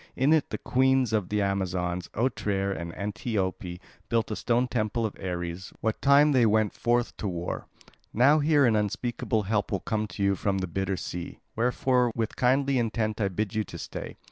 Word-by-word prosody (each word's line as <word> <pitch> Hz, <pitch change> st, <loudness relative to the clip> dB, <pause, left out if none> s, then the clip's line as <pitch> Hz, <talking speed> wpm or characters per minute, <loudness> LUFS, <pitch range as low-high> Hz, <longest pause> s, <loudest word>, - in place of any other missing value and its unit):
In 140 Hz, +4 st, +3 dB
it 155 Hz, -3 st, +2 dB
the -, -, -3 dB
Queens 130 Hz, -2 st, +2 dB
of 105 Hz, -5 st, 0 dB
the 105 Hz, -1 st, +1 dB
Amazons, 90 Hz, -2 st, -1 dB
Otrere 100 Hz, -5 st, 0 dB
and 85 Hz, +1 st, -5 dB
Antiope, 100 Hz, -4 st, -3 dB, 0.3 s
built 115 Hz, -2 st, +1 dB
a -, -, -1 dB
stone 120 Hz, +3 st, +1 dB
temple 115 Hz, -1 st, -1 dB
of 110 Hz, -, -3 dB
Ares 85 Hz, 0 st, -4 dB
what 110 Hz, 0 st, -2 dB
time 140 Hz, +2 st, +6 dB
they 125 Hz, -4 st, +4 dB
went 110 Hz, -1 st, +2 dB
forth 120 Hz, 0 st, 0 dB
to 105 Hz, -, -3 dB
war. 85 Hz, -2 st, -4 dB, 0.4 s
Now 140 Hz, +7 st, +5 dB
here 145 Hz, -1 st, +4 dB
an 115 Hz, -3 st, +3 dB
unspeakable 110 Hz, +1 st, -1 dB
help 105 Hz, 0 st, -1 dB
will 100 Hz, -, 0 dB
come 110 Hz, 0 st, -1 dB
to 100 Hz, -, -4 dB
you 100 Hz, 0 st, +3 dB
from 95 Hz, +1 st, -1 dB
the 95 Hz, -, -1 dB
bitter 95 Hz, +2 st, -2 dB
sea; 90 Hz, 0 st, -6 dB, 0.2 s
wherefore 125 Hz, +1 st, +2 dB
with 115 Hz, -2 st, -2 dB
kindly 135 Hz, +1 st, +2 dB
intent 110 Hz, -1 st, -1 dB
I 100 Hz, -, +2 dB
bid 100 Hz, +1 st, -2 dB
you 110 Hz, 0 st, 0 dB
stay. -, -, -7 dB
110 Hz, 185 wpm, -27 LUFS, 95-125 Hz, 0.4 s, time